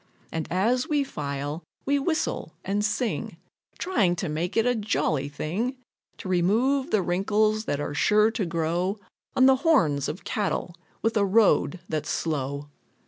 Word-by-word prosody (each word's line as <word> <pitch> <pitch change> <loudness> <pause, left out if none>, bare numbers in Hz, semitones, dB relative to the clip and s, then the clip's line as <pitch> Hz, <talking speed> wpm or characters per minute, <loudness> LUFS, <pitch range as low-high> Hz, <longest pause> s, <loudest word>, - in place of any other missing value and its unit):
And 160 -2 -3
as 230 +8 +1
we 295 -2 +2
file, 145 - -4 0.2
we 285 +1 +2
whistle 315 +3 -2
and 205 +2 0
sing, 220 +3 -1 0.4
Trying 200 - +1
to 175 0 -3
make 165 +6 -2
it 225 - +4
a 245 - +3
jolly 155 - 0
thing, 200 - -2 0.4
To - - -8
remove 225 +10 +2
the 205 -3 +2
wrinkles 215 +4 +1
that 145 - -1
are 145 - -3
sure 210 +7 +4
to 220 -4 -2
grow 170 +4 -1 0.4
On 260 - +5
the 265 0 +6
horns 210 - +3
of 180 - -6
cattle 200 -4 -2 0.3
with 225 +1 +1
a 205 - +4
road 195 -3 +3
that's 155 -2 -3
slow. 145 -2 -2
195 Hz, 155 wpm, -26 LUFS, 160-230 Hz, 0.4 s, the